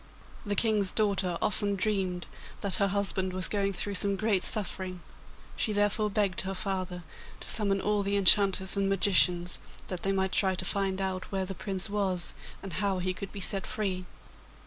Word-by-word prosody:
The 205 - 0
King's 210 -2 +3
daughter 195 -5 0
often 205 -1 +1
dreamed 190 -3 -1 0.4
that 200 -3 +2
her 200 -3 +2
husband 195 -1 -1
was 185 0 +1
going 200 -1 0
through 200 +2 -2
some 200 +1 +2
great 200 -2 +1
suffering: 185 -3 +2 0.5
she 215 - 0
therefore 205 +1 +1
begged 200 -3 0
her 190 0 -4
father 185 -2 -3 0.4
to - - -4
summon 200 -3 +2
all 210 +1 0
the 200 0 -1
enchanters 195 -1 +4
and 200 0 +1
magicians, 180 -3 +2 0.3
that 185 -2 -4
they 195 - 0
might 190 -1 0
try 190 -1 +2
to 185 - -2
find 195 0 +1
out 190 -1 -3
where 190 -1 -1
the 195 - -5
Prince 190 +1 -3
was 195 -5 -2 0.3
and 195 -3 -7
how 200 -2 +1
he 185 0 -1
could 190 +2 -7
be 200 - -7
set 195 +1 +1
free. 190 -4 -3
195 Hz, 180 wpm, -29 LUFS, 185-200 Hz, 0.5 s, enchanters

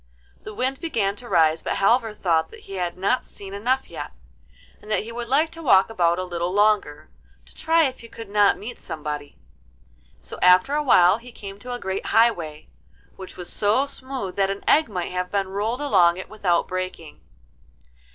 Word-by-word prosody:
The 215 - -9
wind 260 +3 -1
began 225 - -1
to 240 +1 -9
rise, 160 -3 +3
but - - -2
Halvor 225 +2 +2
thought 165 -5 +1
that - - -14
he 195 - -11
had 180 -2 -3
not 200 +7 +1
seen 195 -1 -11
enough 250 +6 -1
yet, - - -7 0.7
and 210 - -14
that 215 - +1
he 230 - -8
would 235 0 -5
like 300 +6 +2
to 330 - -9
walk 225 -8 +4
about 175 -5 +2
a 185 - -2
little 175 -1 -3
longer, 205 -7 +1 0.3
to - - -17
try 325 +1 +2
if 265 -4 -2
he 230 - -11
could 230 0 -10
not 205 0 +3
meet 235 +3 -8
somebody. 150 -2 -6 0.8
So - - -9
after 180 +9 +5
a 300 - +1
while 190 -7 +5
he 245 +1 -13
came 200 -3 -10
to 250 +3 -7
a 245 - -4
great 190 -2 -4
highway, 175 -10 +1 0.5
which 190 -1 -10
was 180 -1 -8
so 215 +7 +2
smooth 260 -8 -7
that 195 -1 +2
an 195 0 -4
egg 310 -4 +4
might 180 -4 -4
have 180 0 -3
been 195 -2 -1
rolled 215 +7 -2
along 180 -11 +4
it 185 - -8
without 190 -5 0
breaking. 185 -4 -6
200 Hz, 195 wpm, -23 LUFS, 180-240 Hz, 0.8 s, after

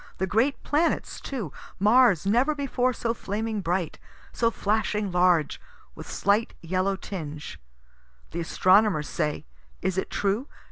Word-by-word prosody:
The 190 - 0
great 225 +9 +1
planets 315 +3 0
too 215 - -5 0.2
Mars 210 -3 +4
never 245 +9 +3
before 260 -3 0
so 230 -2 -2
flaming 215 0 -3
bright, 175 -2 -2 0.3
so 230 - +2
flashing 210 -2 -1
large, 175 -3 +2 0.3
with - - -10
slight 205 +3 +1
yellow 185 +3 0
tinge, 155 -6 -7 0.7
(the 170 - -4
astronomers 185 -1 +3
say 150 -2 -2 0.3
is 190 0 -1
it - - -4
true? 205 +7 -1
200 Hz, 130 wpm, -26 LUFS, 180-230 Hz, 0.7 s, Mars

